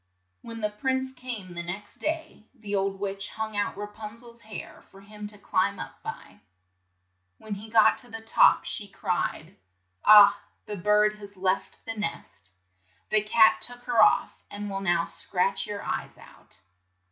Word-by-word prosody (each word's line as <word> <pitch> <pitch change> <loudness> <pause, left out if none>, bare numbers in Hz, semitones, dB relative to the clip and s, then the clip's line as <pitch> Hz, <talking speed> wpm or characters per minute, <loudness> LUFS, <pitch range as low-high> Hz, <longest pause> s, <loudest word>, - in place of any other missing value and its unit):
When 230 -1 -8
the 210 0 0
prince 260 +4 -1
came 235 -8 -5
the 175 - -4
next 190 +4 -5
day, 315 -8 -4
the 210 -4 -4
old 195 0 -1
witch 195 0 -4
hung 220 -1 -5
out 205 -1 -1
Ra 205 - -4
pun 210 +1 -9
zel's 235 0 -12
hair 215 -3 -9
for 195 - -16
him 210 +1 -9
to 210 0 -13
climb - - 0
up - - -8
by. - - -8 1.0
When 215 - -7
he 205 +2 -8
got 220 -1 +5
to 245 - -6
the 225 -1 -7
top, 225 - +4
she - - -3
cried, - - -3 0.5
"Ah, 205 -1 +8 0.2
the 210 - -5
bird 210 +2 +3
has 205 -1 -12
left 185 +1 -1
the 225 - -3
nest! 165 - -6 0.6
The 215 - +5
cat 220 +1 +5
took 245 0 -4
her 240 -3 +3
off, - - +3
and 205 0 -6
will 195 0 -3
now 175 -3 +2
scratch 190 +3 -1
your 205 -1 -5
eyes - - -4
out - - -16
210 Hz, 170 wpm, -27 LUFS, 195-225 Hz, 1.0 s, Ah